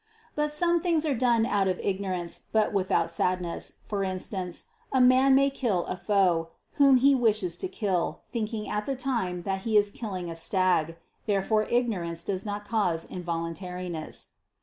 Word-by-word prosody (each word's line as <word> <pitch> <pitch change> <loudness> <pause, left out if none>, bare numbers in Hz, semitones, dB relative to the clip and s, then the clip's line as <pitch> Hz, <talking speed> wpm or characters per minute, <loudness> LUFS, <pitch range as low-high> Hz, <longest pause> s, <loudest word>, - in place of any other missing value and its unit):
But 300 0 0
some 340 +3 +2
things 330 -3 +1
are 295 - +1
done 235 -2 +2
out 200 -4 +1
of 185 -1 0
ignorance, 185 -3 -3
but 220 -1 +2
without 190 -1 +1
sadness: 180 -2 -2
for 200 -2 -1
instance, 185 -1 -3 0.3
a 265 - +2
man 255 +2 +6
may 275 +1 +4
kill 220 -10 0
a - - -3
foe, 180 -3 +1 0.3
whom 275 -2 +7
he 275 +3 +5
wishes 215 -8 +1
to 375 - -2
kill, 200 - -1
thinking 220 -2 -3
at 210 0 -3
the 275 - -1
time 230 -10 -2
that 195 +1 -1
he 220 +1 +2
is 205 0 +3
killing 190 -7 -5
a 165 - -5
stag. 165 -2 +1 0.3
Therefore 215 +1 +1
ignorance 185 -9 -1
does 195 +2 -3
not 205 0 -4
cause 190 -7 0
involuntariness. 175 -1 -5
200 Hz, 165 wpm, -27 LUFS, 180-240 Hz, 0.3 s, whom